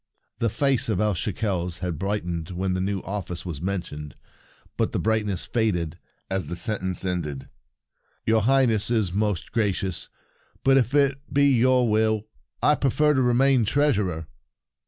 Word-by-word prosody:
The 115 - +1
face 135 +1 +1
of 100 -5 0
El 105 -1 +2
Shekels 90 -3 -2
had 90 -4 -4
brightened 90 -5 -2
when 95 +1 -2
the 90 - -1
new 95 0 -1
office 95 -4 -5
was 80 -5 -5
mentioned, 80 -7 -4 0.6
but - - 0
the - - 0
bright 110 -1 +1
ness 95 -4 -3
faded 90 -9 -1 0.3
as 95 0 -2
the 85 - -4
sentence 95 -2 -2
ended. 75 -7 -3 0.4
" - - -44
Your 110 0 +3
Highness 120 -3 +3
is 110 -7 +1
most 105 -3 -1
gra 110 -3 +2
cious; 95 -2 -3 0.5
but, 135 0 +5
if 135 +1 +2
it 140 -1 +3
be 140 0 +4
your 130 -1 +4
will, 110 0 +2 0.4
I 150 - +6
prefer 150 +2 +2
to 130 - +2
remain 125 +1 +4
Treasurer." 105 - +1
105 Hz, 160 wpm, -25 LUFS, 90-120 Hz, 0.6 s, I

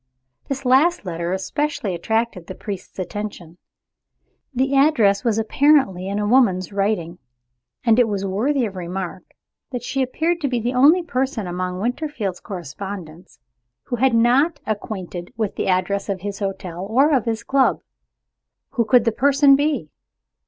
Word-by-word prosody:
This 275 -1 -4
last 280 +4 +3
letter 170 -1 -3
especially 205 +2 -2
attracted 220 0 -2
the 185 - -7
priest's 200 -3 -7
attention. 185 -3 -6 0.9
The 265 +1 0
address 245 -9 +4
was 230 -3 +1
apparently 225 -5 +3
in 200 +1 -2
a 210 - 0
woman's 205 -7 +3
handwriting. 195 -4 -1 0.6
And 230 +1 +4
it 245 - +5
was 200 -2 -2
worthy 240 +8 0
of 200 -3 -6
remark 180 +1 -5 0.5
that 245 -2 -5
she 270 +2 -2
appeared 325 +7 -1
to 285 - +1
be 250 -2 -1
the 240 +3 -2
only 300 +8 +5
person 260 - -2
among 180 +1 -3
Winterfield's 235 - -3
correspondents 180 - -8 0.5
who 245 - -3
was 260 +2 +3
not 255 +7 +3
acquainted 190 -4 -5
with 215 -3 -2
the - - -2
address 195 +2 0
of 190 -2 -2
his 200 0 -5
hotel 190 -3 -4
or 275 +7 +4
of 250 - 0
his 225 -1 -2
club. 270 -1 +2 0.9
Who 235 - 0
could 240 +1 +4
the 230 - +3
person 280 +3 +5
be? 280 - -1
220 Hz, 150 wpm, -21 LUFS, 190-265 Hz, 0.9 s, it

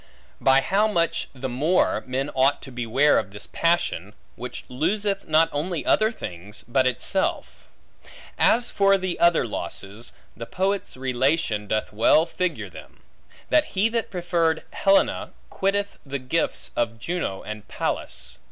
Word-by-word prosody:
By 135 0 +5
how 200 +8 +2
much 170 -6 0
the 130 0 -5
more, 145 +9 +1
men 135 +3 -2
ought 135 +2 +3
to 135 - -9
beware 125 +4 +3
of 105 - -5
this 100 +1 -7
passion, 165 - 0 0.2
which 125 +1 -7
loseth 195 +9 -1
not 160 +1 +4
only 160 +2 -3
other 215 +1 +3
things, 100 - -9
but 130 +1 +2
itself! 130 +9 -1 0.7
As 240 +1 +3
for 195 0 +4
the 185 -2 -3
other 170 -5 +4
losses, 100 +2 -6 0.2
the 115 0 -7
poet's 195 -4 -2
relation 130 -4 0
doth 110 +1 -1
well 115 +9 +4
figure 180 +1 -2
them: - - -14 0.5
that 305 -1 +5
he 210 +4 +4
that 230 -1 -1
preferred 170 -3 0
Helena, 195 0 +2 0.2
quitted 200 +1 0
the 140 0 -4
gifts 130 +6 -1
of 115 -1 -1
Juno 140 - -3
and 105 -1 -7
Pallas. - - -4
145 Hz, 145 wpm, -24 LUFS, 120-185 Hz, 0.7 s, By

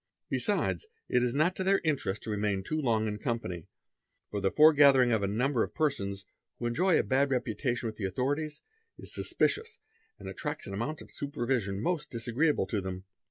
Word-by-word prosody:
Besides 440 - 0 0.2
it 125 - +3
is 125 -1 +1
not 155 +8 +2
to 190 - -1
their 195 +1 +3
interest 140 - -1
to 110 - -4
"Temain 105 -2 0
too 155 0 -1
long 110 -5 +1
in 105 0 -3
company, 105 - -3 0.6
for 105 - -2
the 95 - +2
foregathering 140 -4 +6
of 110 -3 +2
a 100 - +1
number 120 +5 +1
of - - -2
'persons, 100 -11 -1 0.3
who 120 - -5
enjoy 165 +10 +3
a - - +2
bad 135 +2 +2
reputation 125 -1 -1
with 110 -1 -4
the 100 - -3
authorities, 145 - -2 0.3
is - - -6
suspicious 445 +2 0 0.4
anc - - -9
attracts 150 0 -4
an 100 - -6
amount 125 +10 -3
of - - -13
supervision 120 -8 -2
most 155 -3 -1
disagreeable 120 +6 +1
to 105 -4 -2
them. 95 0 -5
125 Hz, 185 wpm, -30 LUFS, 105-150 Hz, 0.6 s, foregathering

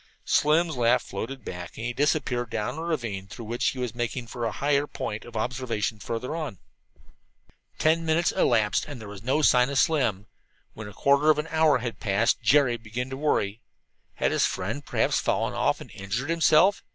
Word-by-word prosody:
Slim's 155 +2 +2
laugh 120 -1 +3
floated 125 +7 -6
back 90 -1 -7
and 115 - -5
he 120 - -2
disappeared 130 -3 0
down 115 +6 -3
a - - -4
ravine 120 - -3
through 115 +4 -9
which 120 +2 -1
he - - -1
was 125 -3 -3
making 120 +1 -3
for 120 0 -5
a 115 - -1
higher 145 +2 +1
point 105 -6 -5
of 120 -2 -8
observation 120 -2 -2
further 115 +8 -4
on. 155 - -4 1.2
Ten 160 +1 +2
minutes 165 +2 +2
elapsed 110 - +2
and 145 -4 -7
there 110 - -9
was 100 -1 -9
no 135 +7 0
sign 125 -2 +5
of 140 - -2
Slim. 120 - +2 0.5
When 110 -1 -8
a 105 - -10
quarter 140 +6 +3
of 155 - +5
an 150 +2 -3
hour 160 -2 +4
had 120 -1 -5
passed 105 +3 +1
Jerry 135 -5 +4
began 120 +3 -5
to - - -3
get - - -9
worried. 110 -8 0 0.6
Had - - 0
his - - +2
friend 110 +10 -4
perhaps - - +1
fallen - - 0 0.3
and - - -11
injured 110 +10 -3
himself? 165 +4 +4
125 Hz, 190 wpm, -26 LUFS, 110-150 Hz, 1.2 s, sign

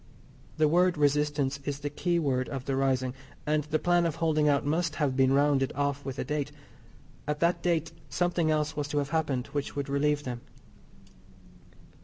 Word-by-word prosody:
The 155 -1 +4
word 175 +2 +3
"resistance" 145 -1 +1
is 140 0 -4
the 145 0 -3
keyword 145 -6 0
of 135 -2 -5
the 135 - -1
rising, 130 -2 +1 0.3
and 150 -1 +1
the 155 +1 0
plan 175 +1 +2
of 160 - -3
holding 155 -2 +2
out 140 -1 +2
must 155 +1 0
have 145 -4 0
been 130 0 +4
rounded 140 -1 +3
off 140 0 -1
with 135 -1 -5
a - - -1
date. 150 -1 -2 0.8
At 150 0 -1
that 170 0 +2
date 165 -2 0 0.2
something 175 -2 +1
else 155 0 0
was 145 -1 -2
to 150 0 -3
have 140 -1 0
happened 145 -6 0
which 145 -1 -3
would 140 -1 -3
relieve 145 +1 +1
them. 120 -3 -5
145 Hz, 180 wpm, -29 LUFS, 140-155 Hz, 0.8 s, The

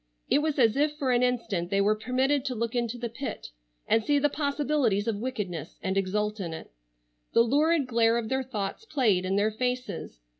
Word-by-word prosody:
It - - +5
was 310 -1 -1
as 230 -4 +4
if 295 +1 +1
for 270 -4 0
an 245 0 +3
instant 230 -8 0
they 195 - +1
were 205 +2 +4
permitted 255 +5 0
to 260 -2 -2
look 230 +1 -2
into 240 -1 -1
the 240 0 -3
pit, 245 +4 -6 0.4
and 225 - +3
see 290 +6 +2
the 290 +1 +3
possibilities 280 -7 0
of 225 -3 0
wickedness, 190 - -4
and 190 0 -1
exult 210 +2 -1
in 170 -4 -4
it. - - -10 0.6
The 230 - +6
lurid 295 +5 +2
glare 230 -1 +3
of 230 -2 -2
their 265 +3 0
thoughts 215 - -4
played 230 - +1
in 190 +1 0
their 205 +2 +2
faces. 250 - -3
235 Hz, 200 wpm, -28 LUFS, 210-270 Hz, 0.6 s, The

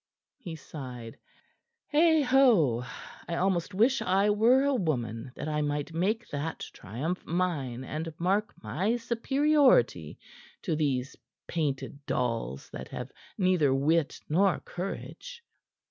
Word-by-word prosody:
He 175 -10 -7
sighed. 125 -7 -9 0.7
"Heigho! 265 - +4 0.4
I 170 - -2
almost 185 +1 0
wish 245 +7 +3
I 195 +3 +3
were 235 +6 +4
a 280 0 +2
woman, 125 - -2
that - - -5
I 150 -1 0
might 145 +1 -2
make 210 +8 0
that 150 +2 -4
triumph 145 - -4
mine 155 -8 -2
and 155 +4 -4
mark 195 +5 +1
my 200 +8 0
superiority 245 - +2 0.5
to 160 - 0
these 140 -3 -1 0.3
painted 145 -3 -3
dolls 115 - -2
that - - -7
have - - -7 0.3
neither 180 -8 +3
wit 155 +3 +1
nor 185 +4 +3
courage." 470 - -7
170 Hz, 115 wpm, -29 LUFS, 140-215 Hz, 0.7 s, Heigho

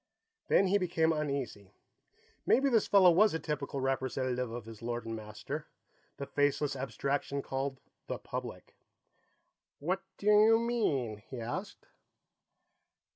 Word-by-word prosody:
Then 195 - +4
he 200 +2 +3
became 165 -3 +2
uneasy. 140 -10 -4 0.7
Maybe 275 +2 +4
this 225 -3 +3
fellow 190 -3 +7
was 195 +1 +4
a - - -1
typical 145 -3 -3
representative 130 -1 -1
of 115 -1 -6
his 115 -1 -11
lord 120 0 -3
and 115 0 -4
master, 105 -1 -6 0.5
the 140 - -4
faceless 145 0 +1
abstraction 135 +2 -2
called 135 0 -3 0.3
the - - -3
Public. - - -7 1.0
"What 185 +6 -1 0.2
do - - -10
you 210 +2 +6
mean?" 145 - 0
he 130 - -6
asked. 185 - -5
140 Hz, 130 wpm, -32 LUFS, 125-185 Hz, 1.0 s, fellow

